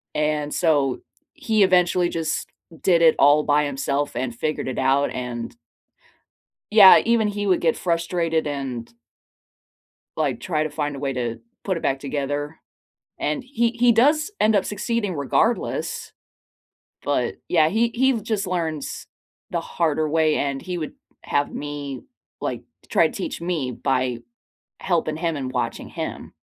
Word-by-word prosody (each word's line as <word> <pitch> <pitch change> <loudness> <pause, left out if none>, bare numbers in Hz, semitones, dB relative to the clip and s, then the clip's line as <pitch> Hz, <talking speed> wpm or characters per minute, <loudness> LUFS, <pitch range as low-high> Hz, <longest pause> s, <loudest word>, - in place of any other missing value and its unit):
And 150 -1 0
so 145 -6 +1 0.3
he 220 -2 +2
eventually 180 -1 +3
just 160 -2 -2 0.3
did 175 -3 +3
it 165 -1 +6
all 145 +2 +6
by 150 0 +3
himself 140 0 -2
and 125 0 -2
figured 155 +4 -3
it 130 - -3
out 135 +2 +2
and 120 -2 -5 1.2
yeah, 205 -3 +9
even 230 -2 +3
he 205 0 -3
would 185 -3 +3
get 165 -2 +2
frustrated 170 -2 0
and 130 -5 -4 1.3
Like, 145 -4 0
try 155 -4 -1
to 155 - -2
find 145 -1 -3
a - - -7
way 135 -1 -2
to 120 -2 -3 0.2
put 190 -2 -1
it - - -5
back 135 0 0
together, 145 +2 -3 0.6
and 290 - -1
he 250 -2 0
he 240 0 +4
does 300 - +3
end 215 +1 +4
up 200 -2 +2
succeeding 210 -2 -2
regardless, 140 -2 -1 0.9
but, 135 -4 -1
yeah, 160 -3 +4
he 230 +4 +2
he 265 +2 +3
just 210 -2 -2
learns 165 -5 -3 0.4
the - - -1
harder 155 -2 0
way, 155 0 +2
and 140 -1 -1
he 180 -1 -5
would 155 -3 -4 0.3
have 145 0 0
me, 145 -2 -5 0.4
like - - -3 0.2
to - - -25
try - - +4
to - - -5
teach 310 - -4
me 170 -7 -2
by 125 -1 -1 0.6
helping 160 -4 0
him 165 -1 -1
and 130 -3 -4
watching 125 -1 -3
him. - - -6
155 Hz, 150 wpm, -23 LUFS, 140-185 Hz, 1.3 s, yeah